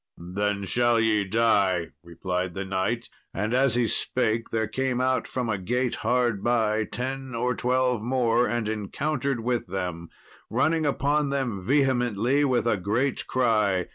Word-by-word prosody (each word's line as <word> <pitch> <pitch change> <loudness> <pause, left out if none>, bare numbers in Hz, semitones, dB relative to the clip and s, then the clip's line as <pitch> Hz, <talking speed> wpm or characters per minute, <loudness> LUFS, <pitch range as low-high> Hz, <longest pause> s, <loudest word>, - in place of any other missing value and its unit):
"Then 100 +3 -2
shall 120 +4 +2
ye 110 -2 +2
die," 95 -5 +2
replied 90 +1 -3
the 95 0 -3
knight, 95 +5 -1 0.3
and 105 +4 -1
as 130 -1 +3
he 120 -1 +2
spake 115 -1 -1
there 110 -1 0
came 130 +2 -1
out 130 0 +1
from 125 -2 -3
a 100 -4 -1
gate 125 +6 -1
hard 120 -2 0
by, 110 -2 +1
ten 130 +1 -4
or 125 +2 0
twelve 125 -1 +1
more, 120 0 +2
and 120 -2 -1
encountered 125 +5 -2
with 120 -1 -1
them, 90 -2 -4 0.4
running 155 +7 +1
upon 145 +1 +1
them 125 -9 -2
vehemently 130 0 +2
with 130 -4 +1
a 115 -3 +2
great 110 +9 -1
cry. 105 -7 +1
115 Hz, 150 wpm, -26 LUFS, 100-130 Hz, 0.4 s, as